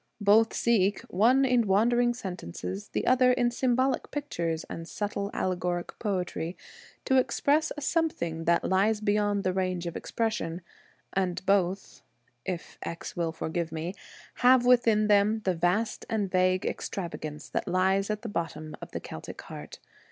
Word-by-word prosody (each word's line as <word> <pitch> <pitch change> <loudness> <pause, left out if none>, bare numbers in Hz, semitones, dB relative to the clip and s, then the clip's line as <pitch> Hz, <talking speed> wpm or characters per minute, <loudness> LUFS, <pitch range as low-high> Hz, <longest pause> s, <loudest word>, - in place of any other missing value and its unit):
Both 215 +2 +4
seek 205 -4 +2
— - - -17 0.2
one 260 +4 +5
in 245 -4 +3
wandering 240 +5 +3
sentences, 100 - -6
the - - -2
other 255 0 +5
in 245 -1 +2
symbolic 255 +1 +1
pictures 170 - -3
and 165 0 -7
subtle 200 0 -3
allegoric 180 -1 -2
poetry 180 -4 -2 0.2
— - - -22
to 265 - +3
express 290 +4 +2
a - - -5
something 170 - -1
that 170 0 +3
lies 205 +3 +2
beyond 205 -1 +1
the 185 - +1
range 185 -2 -1
of 170 - -4
expression; 215 -7 -2 0.5
and 185 -1 -1
both, 195 -1 0 0.4
if 180 -3 -5
X 170 +2 -6
will 170 -2 -1
forgive 160 +1 -3
me, 165 +3 -4 0.4
have 250 0 +5
within 235 -4 +4
them 210 +1 +3
the 185 - +2
vast 180 +7 0
and 210 -5 -1
vague 185 +1 +2
extravagance 155 -5 -4
that - - -2
lies 190 +2 +2
at 210 +1 -2
the - - -4
bottom 160 -5 -4
of - - -9
the - - -2
Celtic - - -9
heart. - - -9
195 Hz, 155 wpm, -28 LUFS, 175-235 Hz, 0.5 s, one